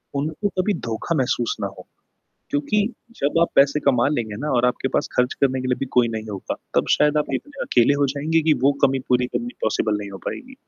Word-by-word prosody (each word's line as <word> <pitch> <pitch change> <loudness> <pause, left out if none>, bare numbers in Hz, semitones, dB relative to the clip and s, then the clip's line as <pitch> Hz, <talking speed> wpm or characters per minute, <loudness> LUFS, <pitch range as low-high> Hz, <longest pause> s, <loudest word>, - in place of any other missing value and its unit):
उनको 155 +8 -1
कभी 205 +3 0 0.2
धोखा 115 +9 -2
महसूस 120 -2 0
ना 100 - 0
हो, 95 -2 -12 0.6
क्योंकि 150 +9 +1 0.4
जब 145 +4 +1
आप 170 - +4
पैसे 140 +2 +5
कमा 130 -3 +3
लेंगे 115 -8 -2
ना 150 +1 -2
और 120 - +3
आपके 125 +2 0
पास - - 0
ख़र्च 125 0 +2
करने 130 -1 +2
के 130 - -2
लिए 125 - +1
भी 135 - -1
कोई 120 -1 +4
नहीं 110 -1 -5
होगा, 100 -2 -4 0.2
तब - - +2
शायद 150 0 +3
आप 150 - 0
इतने 290 -1 -5
अकेले 125 +3 +3
हो 140 - +4
जाएँगे 160 +3 +1
कि - - +7
वो 140 - +6
कमी 135 0 -1
पूरी 125 0 +3
करनी 240 - -4
पॉसिबल 110 -1 +1
नहीं 100 -1 -7
हो 95 - -8
पाएगी। 265 +1 -6
135 Hz, 225 wpm, -22 LUFS, 120-150 Hz, 0.6 s, कि